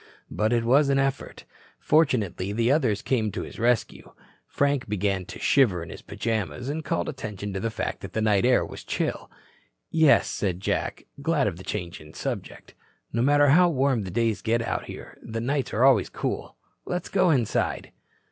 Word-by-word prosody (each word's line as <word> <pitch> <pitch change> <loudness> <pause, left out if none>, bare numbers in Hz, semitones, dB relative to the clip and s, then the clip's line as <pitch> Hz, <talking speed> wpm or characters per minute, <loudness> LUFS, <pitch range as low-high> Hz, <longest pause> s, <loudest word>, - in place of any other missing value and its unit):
But 110 +1 0
it 120 -1 +2
was 140 +5 +4
an 135 - +3
effort. 135 -1 -2 0.3
Fortunately 110 - +1
the 115 +4 +1
others 125 -9 +1
came 110 -5 0
to - - -3
his - - -10
rescue. 120 0 0 0.3
Frank 140 -5 0
began 100 -2 -1
to - - -9
shiver 105 -12 +3
in 80 - -9
his - - -9
pajamas 110 - -3
and 155 +2 -3
called 165 - -1
attention 105 -8 -5
to 95 - -2
the 115 - -1
fact - - -4
that - - -8
the - - -1
night 105 -3 +3
air 125 0 +4
was - - -9
chill. - - -3 0.6
"Yes," 160 -3 +5
said 90 -4 -2
Jack, 95 - -2 0.2
glad 150 -1 +1
of 95 -5 -2
the 95 - -10
change 90 -5 -5
in 75 0 -14
subject, - - -6 0.4
"no 115 - +1
matter 145 +2 +4
how 175 +5 +6
warm 135 -5 +1
the 95 - -5
days 115 +3 0 0.2
out - - -2
here, - - -10
the 115 0 -5
nights 130 +2 -1
are 115 - +1
always 130 -8 +5
cool. - - -4 0.3
Let's 180 0 -3
go 185 -2 +3
inside." 125 -9 0
115 Hz, 185 wpm, -26 LUFS, 105-140 Hz, 0.6 s, how